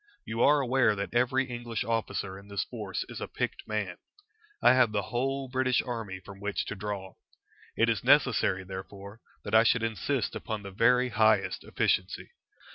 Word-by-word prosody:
You 110 +1 -3
are 145 +2 +5
aware 125 -4 +3
that 100 +2 -4
every 125 +2 +2
English 120 -3 -4
officer 105 -4 -2
in 100 - -16
this 100 -1 -2
force 105 -6 -5
is - - -8
a - - -3
picked - - -4
man. 105 -4 -3 0.6
I - - +6
have 130 -4 +4
the 105 -1 -1
whole 135 +2 -1
British 130 0 +1
army 115 -6 -4
from 95 +1 -12
which 100 0 -2
to - - -5
draw. 100 -2 -6 0.6
It 115 - +4
is 115 -2 0
necessary, 125 -8 +3
therefore, 100 +3 -9 0.2
that - - -6
I 110 - +8
should 115 0 +2
insist 115 +3 -1
upon 110 -2 -4
the 100 - -7
very 125 +5 +3
highest 110 -3 +2
efficiency. 90 0 -1
110 Hz, 175 wpm, -29 LUFS, 100-125 Hz, 0.6 s, I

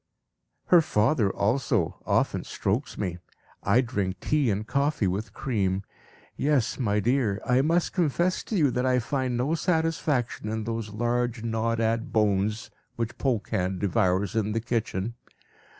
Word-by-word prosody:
"Her 175 -2 +7
father 110 -5 +2
also 110 - 0
often - - +1
strokes 115 +10 -2
me. 90 -4 -3 0.4
I 110 +6 +4
drink 100 -7 -2
tea 145 0 +1
and 105 +1 -1
coffee 140 -2 0
with 100 +3 -2
cream. 100 -6 -1 0.5
Yes, 140 -4 +1
my 105 -4 +1
dear, 115 -2 +1
I 125 +1 +3
must 165 +4 +1
confess 175 +1 +1
to 220 - -3
you 145 -6 +3
that 125 - -1
I 130 -1 +3
find 125 0 -1
no 130 +6 0
satisfaction 160 - 0
in 110 0 -2
those 115 -1 -3
large, 120 +1 -1
gnawed 115 0 0
at 115 0 0
bones 105 +1 +1 0.2
which 115 0 -4
Polkan 105 -7 0
devours 100 0 +1
in 105 -1 0
the 115 - 0
kitchen. 115 -2 -2
115 Hz, 145 wpm, -27 LUFS, 105-135 Hz, 0.5 s, Her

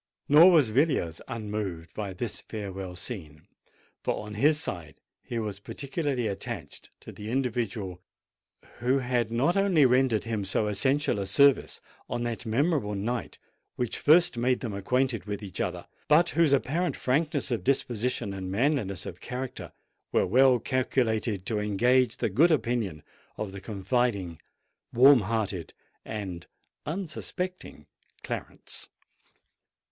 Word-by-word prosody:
Nor 155 +6 +8
was 150 -11 +5
Villiers 130 - +1
unmoved 105 -7 -4
by 105 -3 -4
this 105 +4 -4
farewell 95 -4 -6
scene; 85 - -6 0.6
for, - - -2
on 105 - -8
his 150 +8 +3
side, 85 - -4 0.3
he 120 - -5
was 105 -3 -3
particularly 140 +2 -3
attached 100 -5 -6
to - - -9
the 105 +1 -8
individual 115 -7 -2 0.8
who 125 +3 +2
had 125 -3 0
not 135 +9 +2
only 195 -7 +4
rendered 125 -3 +3
him 110 -3 -2
so 95 +3 0
essential 130 +3 +1
a 100 - -3
service 140 +7 +4 0.3
on 120 -1 -2
that 120 0 -4
memorable 125 -3 +1
night 115 +2 -3 0.4
which 125 -2 -2
first 160 -3 +5
made 125 +1 +1
them 115 -5 -4
acquainted 120 +2 0
with 105 0 -5
each 95 -4 -5
other, - - -3 0.2
but 165 +3 +5
whose 165 -4 +3
apparent 150 +6 +1
frankness 145 +1 0
of 120 - -1
disposition 125 -4 0
and 95 -1 -5
manliness 105 - 0
of 90 - -8
character 125 -8 -6 0.4
were - - +3
well 130 +6 +5
calculated 115 -5 0
to 105 0 -1
engage 120 +4 +2
the - - 0
good 150 - +5
opinion 115 - 0 0.3
of 105 -2 -4
the 100 0 -8
confiding, 100 -4 -1 0.5
warm 135 +2 +7
hearted, 105 -4 -2 0.3
and 95 -6 -6 0.4
unsuspecting 180 +2 -5 0.4
Clarence. - - -6
120 Hz, 135 wpm, -28 LUFS, 100-135 Hz, 0.8 s, Nor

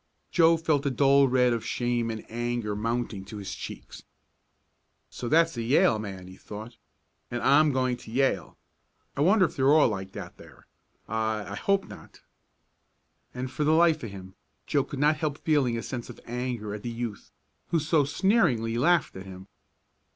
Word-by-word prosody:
Joe 165 -1 +5
felt 160 -3 +1
the 140 - 0
dull 140 +1 +4
red 125 -1 +3
of 115 - -2
shame 120 -1 -1
and 110 -1 -5
anger 120 -2 -3
mounting 115 -2 -2
to 105 +1 -9
his 100 -1 -6
cheeks. - - -9 1.1
"So 120 - -5
that's 165 0 +3
a - - -1
Yale 115 -2 +3
man," 95 -3 -7
he 95 0 -12
thought. 110 +3 -9 0.5
"And 120 - -3
I'm 150 +3 +5
going 130 -2 0
to 110 - -12
Yale. 125 -8 0 0.6
I 140 - -2
wonder 190 +4 +5
if - - -5
they're 135 0 +3
all 150 -4 +5
like 95 -2 -5
that - - -8
there? - - -16 0.4
I 110 -2 -2
I - - -4
hope 195 - +1
not." - - -13 1.1
And, 125 +1 -4
for 150 - -2
the 155 +1 +3
life 160 -1 +4
of 115 - -5
him, 95 -1 -10 0.3
Joe - - +1
could 140 - -7
not 150 +2 +3
help 150 -2 -2
feeling 140 -8 +1
a 115 - -4
sense 120 -2 -6
of - - -10
anger 120 -3 -4
at 105 - -6
the 120 - -4
youth 115 -3 -5 0.4
who 170 - +1
had 155 - -2
so 155 -1 +3
sneeringly 140 - +1
laughed 175 +6 +2
at 95 +1 -9
him. 95 0 -10
125 Hz, 185 wpm, -27 LUFS, 110-150 Hz, 1.1 s, Joe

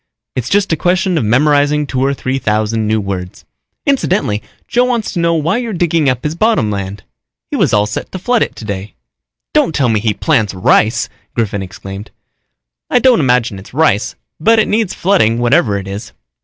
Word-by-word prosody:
It's 125 -1 -2
just 200 -2 +2
a - - +3
question 180 +2 +1
of 160 - +1
memorizing 145 +5 +2
two 130 -2 -1
or 135 - +2
three 130 0 -2
thousand 110 0 0
new 110 0 +1
words. 95 -3 -5 0.4
Incidentally, 190 - +1 0.3
Joe 245 +1 +2
wants 240 -4 -1
to 175 - -2
know 170 0 +2
why 165 +7 +1
you're 235 -3 -4
digging 170 -4 +1
up 125 -1 -2
his 150 - -1
bottom 170 - +1
land. 100 0 -5 0.5
He - - -1
was - - +2
all 105 0 +3
set 105 - -5
to - - -5
flood 240 +6 +1
it - - -1
today." 100 -2 -6 0.6
"Don't 160 - +2
tell 130 -4 +2
me 110 -2 +2
he 105 -1 0
plants 110 -11 +1
rice!" 110 +5 +2 0.3
Griffin 105 -4 -1
exclaimed. 95 +1 -8 0.8
"I - - +3
don't 250 -1 +4
imagine 125 -7 +1
it's 100 +6 -14
rice, 145 -10 +2 0.2
but 225 +8 +4
it 220 - +3
needs 215 -2 0
flooding 170 - +2
whatever 120 -3 +2
it 95 -1 -6
is." 100 +4 -7
130 Hz, 190 wpm, -15 LUFS, 105-175 Hz, 0.8 s, don't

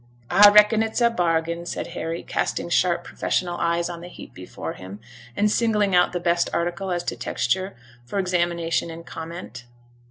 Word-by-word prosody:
'A 205 0 +8
reckon 210 +1 +6
it's 225 +1 -1
a 235 -1 +4
bargain,' 170 -4 0
said 175 - -5
Harry, 165 +1 -4
casting - - -2
sharp, 175 0 +2
professional 175 0 -2
eyes 170 0 0
on 170 -1 -7
the 175 - -9
heap 180 - -12
before 90 0 -7
him, 95 +2 -10 0.4
and 210 0 +2
singling 210 -4 +1
out 180 0 +4
the 175 - -2
best 170 0 +1
article 175 +3 -2
as 175 -1 -1
to - - -3
texture 190 +1 -2 0.3
for 125 +11 -6
examination 170 -3 0
and 165 0 -9
comment. 160 -7 -8
175 Hz, 170 wpm, -23 LUFS, 170-195 Hz, 0.4 s, A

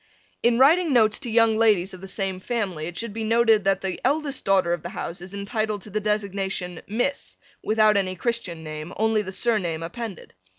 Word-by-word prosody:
In 235 0 +3
writing 310 +4 +5
notes 220 -3 +4
to 245 - -4
young 225 -1 +4
ladies 210 -4 +3
of 185 - -10
the 195 - -8
same 190 -1 -2
family 190 -8 -3
it 175 -1 -7
should 230 -3 -4
be 225 0 -4
noted 225 -2 +3
that 195 -1 +2
the 190 -2 -4
eldest 290 -1 0
daughter 190 -3 +3
of 175 - -3
the - - -6
house 170 +1 -6
is 185 +2 -8
entitled 210 0 -2
to 210 - -11
the 215 - 0
designation 195 -4 -2
Miss 245 +7 -2 0.3
without 215 -1 +4
any 185 -2 0
Christian 185 -6 -3
name, 155 +2 -7
only 220 0 +2
the 190 -2 -6
surname 190 -7 -1
appended. 215 +2 -7
210 Hz, 200 wpm, -24 LUFS, 185-225 Hz, 0.3 s, writing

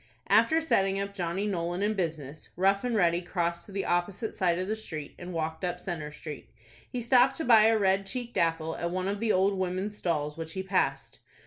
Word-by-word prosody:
After 320 0 +5
setting 195 -11 +2
up 200 0 -3
Johnny 185 +1 -2
Nolan 175 -1 -2
in 210 +1 +1
business, 155 -6 -4
Rough 195 +2 +2
and 245 -2 -1
Ready 175 -4 +3
crossed 170 -1 -2
to - - -11
the 195 0 -2
opposite 180 +5 -1
side 175 -4 +1
of 185 +1 -2
the 215 - -1
street, 160 -9 -7
and 180 0 -7
walked 160 0 -3
up 180 0 -2
Centre 165 -5 -5
Street. 150 -2 -9 0.4
He 245 -1 -3
stopped 250 +2 +4
to 320 - -3
buy 225 -3 +7
a 225 0 +5
red 195 -1 +2
cheeked 245 +2 -5
apple 165 -1 0
at 170 - -2
one 185 +1 -2
of 200 +1 -2
the 225 0 +1
old 195 +1 +3
women's 190 +3 -2
stalls 150 -5 -2
which 165 0 -6
he 190 - -3
passed. 190 0 -1
185 Hz, 215 wpm, -29 LUFS, 170-205 Hz, 0.4 s, buy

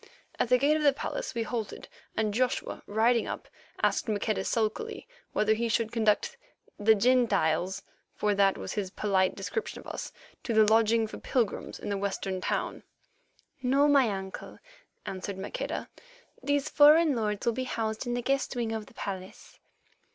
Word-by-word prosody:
At - - +1
the 250 - +6
gate 285 +4 +3
of 310 - 0
the 285 -2 +5
palace - - -4
we 230 - 0
halted, 225 -2 -5 0.3
and 215 -1 +1
Joshua, 255 +3 -1
riding 225 +3 +2
up, - - -5 0.4
asked - - +2
Maqueda 210 -1 0
sulkily 235 - -2 0.2
whether 215 +1 +2
he 230 +1 -1
should 225 -1 0
conduct 225 - +1 0.4
"the 220 +1 +5
Gentiles," 195 -6 +2 0.3
for 210 0 +1
that 195 -1 +3
was - - -5
his 200 -3 -2
polite 190 -1 +1
description 200 - -4
of - - -13
us, - - -6 0.3
to 230 - -2
the 215 0 +7
lodging 225 +1 +4
for 215 - -8
pilgrims 235 -6 -1
in - - -6
the 200 -1 -1
western 195 -1 -2
town. - - -2 0.8
"No, 270 +3 +3
my 275 -5 +5
uncle," 190 -1 -6 0.5
answered 190 +1 -5
Maqueda; 195 +1 -4 0.5
"these 285 0 0
foreign 300 0 +6
lords 210 -2 -2
will 235 - +2
be 255 +2 -3
housed 225 -1 -3
in 240 - -1
the 245 - -2
guest 275 0 0
wing 235 -2 -1
of 220 -1 -4
the - - -18
palace." 190 -1 -7
220 Hz, 165 wpm, -29 LUFS, 205-250 Hz, 0.8 s, the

